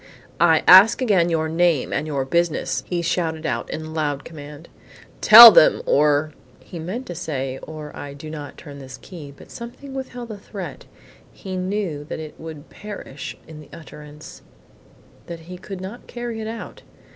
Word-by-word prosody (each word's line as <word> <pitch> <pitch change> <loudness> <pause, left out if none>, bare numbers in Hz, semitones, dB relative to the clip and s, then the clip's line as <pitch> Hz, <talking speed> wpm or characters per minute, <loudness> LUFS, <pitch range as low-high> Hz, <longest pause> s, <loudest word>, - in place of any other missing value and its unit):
"I 165 -1 +4
ask 190 +5 +8
again 195 -9 +2
your 160 -1 0
name 165 -3 +1
and 155 - -2
your 140 -3 -2
business," 170 +2 -1
he 175 -1 -2
shouted 160 -2 -2
out 155 - -3
in 155 0 -6
loud 145 -3 -3
command. 150 0 -11 0.5
"Tell 230 +1 +12
them 165 - +4
or 150 +1 +2 0.2
" - - -29
He 170 - -10
meant 195 +11 -5
to 175 - -7
say, 135 -6 -5
"or 155 -1 -9
I 140 -1 -8
do 145 +2 -10
not 150 -3 -8
turn 140 -1 -11
this 130 -1 -10
key." 155 -2 -11
But 140 - -17
something 240 +4 -10
withheld 250 -3 -7
the 210 -2 -8
threat. 185 -9 -9 0.5
He 190 -1 -8
knew 185 -5 -3
that - - -6
it 155 -1 -8
would 160 -2 -10
perish 200 -10 -9
in 155 -1 -11
the 150 - -14
utterance; 150 -1 -12 0.9
that 170 -1 -8
he 180 +2 -11
could 190 0 -8
not 200 +6 -9
carry 240 -2 -6
it 220 - -5
out. 225 +1 -8
160 Hz, 175 wpm, -21 LUFS, 150-190 Hz, 0.9 s, Tell